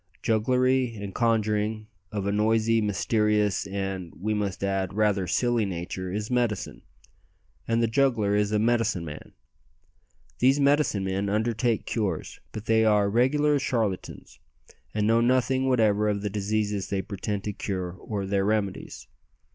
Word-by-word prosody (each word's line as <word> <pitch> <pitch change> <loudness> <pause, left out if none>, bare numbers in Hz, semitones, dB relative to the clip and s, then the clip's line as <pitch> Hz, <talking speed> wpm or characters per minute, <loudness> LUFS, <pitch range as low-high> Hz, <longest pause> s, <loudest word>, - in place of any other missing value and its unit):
Jugglery 125 +2 +2
and 100 -2 -6
conjuring, 110 -2 0 0.3
of 100 -2 -3
a 100 - 0
noisy, 110 +2 +2
mysterious, 105 0 +1
and, 95 -3 -4
we 110 +3 -1
must 100 -2 -2
add, 95 0 -1
rather 105 -3 +1
silly 120 +1 +1
nature, 95 -1 -4
is 105 +4 -4
"medicine," 120 -5 -1 0.9
and 115 0 +1
the - - +3
juggler 115 -4 +2
is 105 0 +1
a 105 - +2
"medicine 115 -5 +1
man." 75 -2 -9 1.1
These 135 +3 +4
medicine 140 -7 +2
men 95 +1 -1
undertake 110 +2 0
cures; 100 -8 -3
but 110 0 -7
they 110 0 +3
are 105 -2 +3
regular 145 +5 +3
charlatans, 110 -8 -3 0.5
and 105 -1 -1
know 115 +2 +4
nothing 130 +2 +2
whatever 105 -4 +3
of 100 -1 -2
the 105 - -2
diseases 105 -1 -1
they 95 -1 -1
pretend 100 0 -4
to 105 - -3
cure 95 -3 -3
or 100 +2 -5
their 100 0 0
remedies. 100 -2 -2
105 Hz, 145 wpm, -26 LUFS, 100-115 Hz, 1.1 s, These